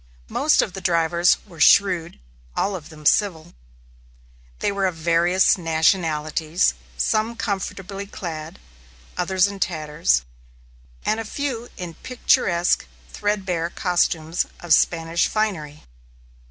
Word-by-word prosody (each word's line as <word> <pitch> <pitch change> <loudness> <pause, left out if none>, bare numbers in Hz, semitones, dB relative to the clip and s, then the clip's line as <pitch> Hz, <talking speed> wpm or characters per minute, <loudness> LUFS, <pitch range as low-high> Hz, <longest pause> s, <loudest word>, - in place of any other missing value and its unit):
Most 300 - +3
of 190 - -5
the 190 - -7
drivers 170 0 +3
were 175 -6 -15
shrewd; 175 0 +4 0.4
all 200 0 0
of 165 -3 -9
them 155 -2 -13
civil. 175 -3 +2 1.0
They - - 0
were 200 -1 0
of 180 - -3
various 170 +4 +3
nationalities; 160 - +1 0.2
some 215 - 0
comfortably 200 -2 -4
clad, 160 -5 -7 0.6
others 190 -1 +2
in 200 -1 -4
tatters, 150 - 0 0.8
and 220 - +1
a - - -3
few 240 0 -4
in 175 -3 -6
picturesque 185 - +1 0.3
threadbare 190 -5 -1
costumes 175 -3 0
of 175 -2 +2
Spanish 165 +1 +2
finery. 170 -9 -2
175 Hz, 115 wpm, -22 LUFS, 160-200 Hz, 1.0 s, shrewd